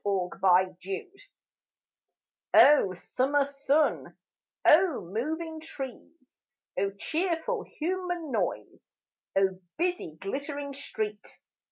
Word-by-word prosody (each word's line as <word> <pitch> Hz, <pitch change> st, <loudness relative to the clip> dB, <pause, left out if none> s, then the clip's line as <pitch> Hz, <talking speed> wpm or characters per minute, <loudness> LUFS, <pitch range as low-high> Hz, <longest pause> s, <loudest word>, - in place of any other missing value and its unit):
O 190 Hz, -3 st, 0 dB, 2.6 s
Summer 275 Hz, +9 st, +1 dB
sun, 280 Hz, +2 st, 0 dB, 0.5 s
O 335 Hz, -2 st, +5 dB
moving 315 Hz, -, -3 dB
trees! 285 Hz, -1 st, -9 dB, 0.4 s
O 200 Hz, -, +1 dB
cheerful 345 Hz, -, -1 dB
human 355 Hz, -3 st, -3 dB
noise, -, -, -3 dB, 0.4 s
O 190 Hz, -1 st, +2 dB, 0.2 s
busy 345 Hz, -, -1 dB
glittering 280 Hz, +6 st, -4 dB
street! 215 Hz, -6 st, -5 dB
285 Hz, 70 wpm, -28 LUFS, 220-325 Hz, 2.6 s, O